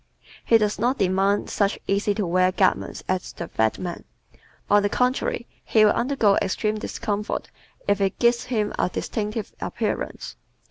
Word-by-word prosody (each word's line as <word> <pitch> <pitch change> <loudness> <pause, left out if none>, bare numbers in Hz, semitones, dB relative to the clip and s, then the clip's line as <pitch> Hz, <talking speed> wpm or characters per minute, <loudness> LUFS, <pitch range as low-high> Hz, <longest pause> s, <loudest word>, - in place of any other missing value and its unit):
He 230 - +5
does 210 -1 0
not 245 +5 +1
demand 195 0 +1
such 200 -1 +1
easy 200 +1 +1
to 205 - -1
wear 185 +1 +3
garments 185 0 0
as 185 -1 -2
the - - -6
fat 110 0 0
man. 175 -2 -5 0.6
On 205 0 +5
the 205 - +1
contrary, 250 0 0 0.2
he 215 -1 +4
will 210 - +5
undergo 235 -6 +2
extreme 215 +3 -1
discomfort 210 0 -3 0.4
if 200 0 +2
it 195 -1 0
gives 235 0 +2
him 215 -4 -1
a - - +2
distinctive 210 +3 -3
appearance. - - -3
205 Hz, 155 wpm, -24 LUFS, 195-220 Hz, 0.6 s, He